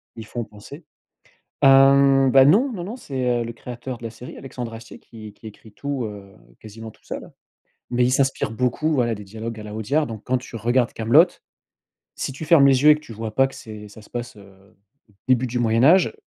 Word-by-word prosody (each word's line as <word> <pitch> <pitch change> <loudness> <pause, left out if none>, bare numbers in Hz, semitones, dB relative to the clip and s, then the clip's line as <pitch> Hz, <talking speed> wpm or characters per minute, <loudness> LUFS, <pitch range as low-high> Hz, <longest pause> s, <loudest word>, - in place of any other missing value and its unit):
y 115 - -8
font 120 +2 -5
penser. 110 +9 -13 0.8
Hem, 135 0 +6
bah, 135 +1 +6
non, 235 - +4
non, 180 -6 -6
non, 220 +7 -6
c'est, 125 - -2
heu, - - -4
le 115 - -6
créateur 120 +1 -8
de 120 - -12
la 115 - -4
série, 120 +3 -11
Alexandre 125 -3 -7
Astier, 115 0 -11
qui 110 -3 -13
qui 110 - -15
écrit 110 0 -13
tout, 140 +2 -4
heu, 100 -2 -11 0.2
quasiment 110 +1 -10
tout - - -25
seul, - - -8 0.6
mais 125 0 +2
il 125 - +1
s'inspire 135 -4 0
beaucoup, 125 +7 -1
voilà, 120 -4 0
des 105 - -10
dialogues 110 +3 -7
à 105 - -9
la 105 0 -8
Audiard. 140 +8 0
Donc, 110 -2 -8
quand 130 0 0
tu 125 - -13
regardes 120 +2 0
Kaamelott, 145 +11 +3 0.7
si - - -4
tu 150 +4 -8
fermes 155 -4 +6
les 135 -1 +3
yeux 150 - +6
et - - +8
que 150 - -7
tu 135 - -12
vois 110 0 -6
pas 135 +3 +4
que - - -15
c'est 105 -1 -10
ça 105 +2 -14
se 105 - -18
passe, 120 -2 -6
heu, 100 0 -19 0.4
au - - -26 0.2
début 130 0 +3
du 120 0 -3
Moyen 115 0 +2
Âge, 180 - +5
120 Hz, 225 wpm, -22 LUFS, 110-135 Hz, 0.8 s, et